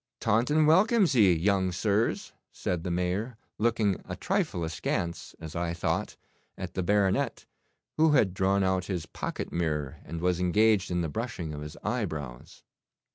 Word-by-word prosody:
'Taunton 145 +9 +2
welcomes 190 +3 +4
ye, 105 -7 +6
young 95 +2 +2
sirs,' 105 +4 0 0.2
said 90 -3 -3
the 90 - -3
Mayor, 90 +7 -1 0.2
looking 110 -4 +1
a - - -3
trifle 85 - -1
askance, 85 +1 -3
as 80 -1 -8
I 85 0 -2
thought, - - -2 0.4
at - - -6
the - - -1
baronet, 100 +1 +1 0.5
who 155 -1 +4
had 105 -10 +3
drawn 95 +1 +2
out 95 -1 +1
his 90 -5 -3
pocket - - -5
mirror, 75 -5 -2
and 85 +2 -6
was 90 0 +1
engaged 100 +2 +3
in 90 0 0
the 85 - -1
brushing 90 -4 -4
of 75 - -6
his 75 0 -8
eyebrows. 60 -6 -4
95 Hz, 155 wpm, -28 LUFS, 85-110 Hz, 0.5 s, ye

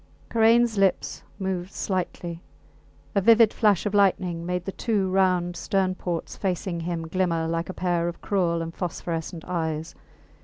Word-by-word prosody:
Karains 230 -1 +4
lips 195 -2 +1 0.2
moved 190 -1 -3
slightly. 175 -3 -3 0.7
A 200 - +2
vivid 225 +1 +6
flash 210 -4 +3
of 205 - -1
lightning 180 -4 +2
made 180 -1 -2
the 195 - -3
two 200 -3 0
round 180 -2 +2
stern 190 +1 0
ports 175 -2 -4
facing 180 -2 -2
him 165 -1 -3
glimmer 165 -2 0
like 165 +1 -2
a - - -3
pair 175 -2 0
of 175 - -5
cruel 170 -4 0
and 165 0 -6
phosphorescent 170 -2 -4
eyes. 160 -3 -2
180 Hz, 150 wpm, -25 LUFS, 170-195 Hz, 0.7 s, vivid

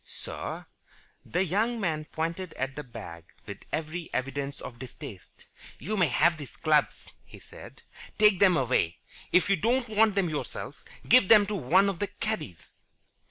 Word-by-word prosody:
"Sir?" - - -6 0.6
The 180 +3 0
young 220 +7 0
man 160 -6 -1
pointed 165 +3 -4
at 135 +1 -3
the 150 - -5
bag 105 - -10 0.2
with - - -8
every 160 +2 -4
evidence 140 +2 -3
of 120 -2 -9
distaste. 110 -7 -11 0.3
"You 205 - -4
may 180 -5 +3
have 165 +5 +3
these 145 -4 -10
clubs," 155 -2 +1
he - - -14
said. - - -14 0.3
"Take 210 -3 +5
them 185 -4 +5
away. 125 - +1 0.3
If 180 - +4
you 195 0 +3
don't 240 +7 +1
want 215 -1 +3
them 195 -3 +2
yourself, 155 -2 -5 0.2
give 250 -6 +6
them 210 -1 +7
to 210 +1 -3
one 185 +5 +3
of 195 -3 -2
the 205 - -1
caddies." 215 - -5
170 Hz, 160 wpm, -28 LUFS, 140-200 Hz, 0.6 s, them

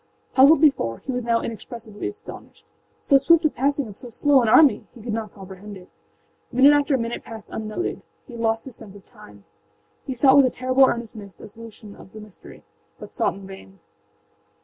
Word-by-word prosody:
Puzzled 275 +3 +6
before, 195 - +2
he 270 - -3
was 250 -1 -3
now 230 0 0
inexpressibly 230 - -7
astonished. 415 +2 -11 0.4
So 275 - +4
swift 320 +4 +3
a 310 - +3
passing 280 0 -1
of 205 - -11
so 245 - -11
slow 275 +3 +2
an 235 - 0
army!âhe 250 -2 +3
could 230 -2 -4
not 220 -2 -5
comprehend 195 +1 -11
it. 180 -1 -16 0.6
Minute 270 +4 +5
after 290 -1 +2
minute 230 -1 -5
passed 220 -2 -11
unnoted; 220 +11 -5 0.2
he 250 - -14
had 230 - -7
lost 225 0 -1
his 260 -4 -11
sense 205 -3 -12
of 200 - -15
time. 100 -1 -17 0.6
He 260 - -4
sought 265 +2 +5
with 280 - +6
a - - 0
terrible 255 +2 +2
earnestness 215 -6 -6
a - - -11
solution 215 -1 -13
of 190 - -16
the 215 - -10
mystery, 210 -2 -15 0.3
but - - -12
sought - - -1
in 195 0 -12
vain. 95 - -13
230 Hz, 195 wpm, -22 LUFS, 210-270 Hz, 0.6 s, Puzzled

